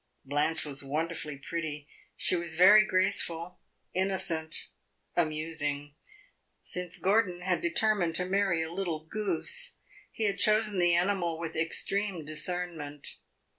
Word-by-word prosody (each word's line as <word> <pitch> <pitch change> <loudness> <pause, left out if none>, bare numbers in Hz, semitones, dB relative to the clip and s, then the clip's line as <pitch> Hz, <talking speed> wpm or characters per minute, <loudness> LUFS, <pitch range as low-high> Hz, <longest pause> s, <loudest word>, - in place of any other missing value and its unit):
Blanche 145 +4 +1
was 145 -1 -3
wonderfully 150 +1 -3
pretty; 150 0 -5 0.3
she - - +4
was 170 -2 -2
very 200 +5 +8
graceful, 180 -3 0 0.3
innocent, 180 -4 -1 0.5
amusing. 155 -3 -1 0.7
Since 180 -1 -3
Gordon 190 -3 +1
had 180 -1 0
determined 175 -1 +1
to 180 - 0
marry 190 -3 +1
a 160 +1 -6
little 170 -4 -3
goose, 215 - -1 0.3
he 225 - -4
had 200 -1 0
chosen 215 -2 +3
the 175 -1 +4
animal 175 -2 +1
with 165 -1 -5
extreme 175 +2 -1
discernment. 155 -2 -2
170 Hz, 120 wpm, -30 LUFS, 160-190 Hz, 0.7 s, very